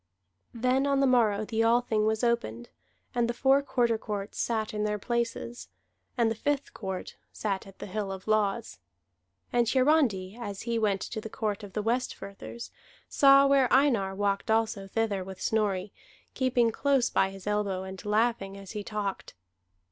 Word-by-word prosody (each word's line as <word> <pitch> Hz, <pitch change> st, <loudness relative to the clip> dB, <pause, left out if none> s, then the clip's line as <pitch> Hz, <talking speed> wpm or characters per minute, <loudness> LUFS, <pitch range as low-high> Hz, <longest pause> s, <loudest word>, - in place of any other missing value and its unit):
Then 255 Hz, +4 st, +2 dB
on 275 Hz, -1 st, +2 dB
the 275 Hz, -, +4 dB
morrow 220 Hz, -5 st, +3 dB
the 225 Hz, +1 st, -1 dB
Althing 225 Hz, -2 st, +2 dB
was 220 Hz, +2 st, 0 dB
opened, 120 Hz, -, -1 dB, 0.4 s
and 235 Hz, -1 st, +1 dB
the 240 Hz, -, -2 dB
four 270 Hz, +2 st, +4 dB
Quarter 245 Hz, -5 st, +1 dB
Courts 205 Hz, -2 st, -5 dB
sat 220 Hz, -2 st, -1 dB
in 210 Hz, 0 st, -1 dB
their 210 Hz, 0 st, 0 dB
places, 235 Hz, +2 st, -3 dB, 0.5 s
and 230 Hz, -2 st, +3 dB
the -, -, -1 dB
Fifth 285 Hz, +4 st, -2 dB
Court 190 Hz, -3 st, -6 dB
sat 195 Hz, -2 st, -3 dB
at 195 Hz, -, -14 dB
the -, -, -7 dB
Hill 205 Hz, 0 st, -3 dB
of 190 Hz, +1 st, -8 dB
Laws. 215 Hz, -, 0 dB, 0.7 s
And 240 Hz, -2 st, +3 dB
Hiarandi, 255 Hz, -8 st, +2 dB
as 200 Hz, -3 st, -5 dB
he 230 Hz, 0 st, -1 dB
went 200 Hz, -3 st, +1 dB
to 220 Hz, -, -5 dB
the 220 Hz, -, -7 dB
court 210 Hz, -2 st, -2 dB
of 200 Hz, -2 st, -10 dB
the 210 Hz, -, -2 dB
Westfirthers, 230 Hz, -1 st, -4 dB, 0.4 s
saw 275 Hz, 0 st, +6 dB
where 275 Hz, -2 st, +4 dB
Einar 235 Hz, -9 st, +3 dB
walked 200 Hz, 0 st, -1 dB
also 220 Hz, -3 st, +1 dB
thither 205 Hz, -2 st, -1 dB
with 190 Hz, 0 st, -9 dB
Snorri, 205 Hz, -3 st, 0 dB, 0.4 s
keeping 245 Hz, -3 st, +2 dB
close 270 Hz, 0 st, +1 dB
by 190 Hz, -, +2 dB
his 195 Hz, -1 st, -11 dB
elbow, 205 Hz, -3 st, -1 dB
and 190 Hz, +1 st, -8 dB
laughing 210 Hz, -2 st, 0 dB
as 195 Hz, -2 st, -10 dB
he 210 Hz, -2 st, -5 dB
talked. 200 Hz, -, -4 dB
220 Hz, 170 wpm, -28 LUFS, 200-240 Hz, 0.7 s, saw